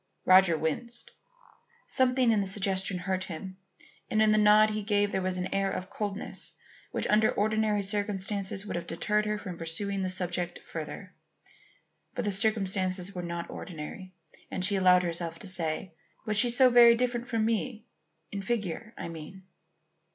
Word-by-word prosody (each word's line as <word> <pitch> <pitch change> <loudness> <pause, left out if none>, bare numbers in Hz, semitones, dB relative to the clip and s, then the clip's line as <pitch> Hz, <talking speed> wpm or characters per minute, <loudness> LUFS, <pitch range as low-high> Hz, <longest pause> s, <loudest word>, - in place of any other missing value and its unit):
Roger 185 -3 +6
winced. 235 +10 -3 0.7
Something 255 -2 +3
in 215 - +3
the 195 - -1
suggestion 195 -1 +1
hurt 185 +1 -2
him, 185 +2 -7 0.5
and 215 - +1
in 215 0 +5
the 215 - +4
nod 210 +1 +6
he 215 0 -2
gave 205 -1 +1
there 190 - -1
was 185 0 -1
an 180 - -3
air 195 0 +1
of 185 0 -5
coldness 205 -1 -5 0.4
which - - -2
under 215 +1 +4
ordinary 215 0 +1
circumstances 200 -1 -1
would - - -4
have 170 0 -4
deterred 210 +5 0
her 210 0 0
from 185 -4 -7
pursuing 195 +4 -2
this 185 -1 -1
subject 175 -1 -2
further. - - -7 1.0
But 245 - -2
the 205 - +1
circumstances 195 -3 +1
were 180 - -4
not 170 -1 -5
ordinary, 185 +2 -8 0.3
and 185 - -1
she 200 +1 +2
allowed 180 -1 +5
herself 170 -1 -3
to 200 - -10
say: 175 -1 -2 0.3
"Was 215 - -1
she 240 +4 +3
so 250 +1 +5
very 235 -1 +8
different 240 0 -1
from 225 -2 0
me, 225 0 -2 0.5
in 200 - -4
figure, 215 +1 -3
I - - -5
mean?" 165 +3 -9
195 Hz, 165 wpm, -29 LUFS, 185-215 Hz, 1.0 s, very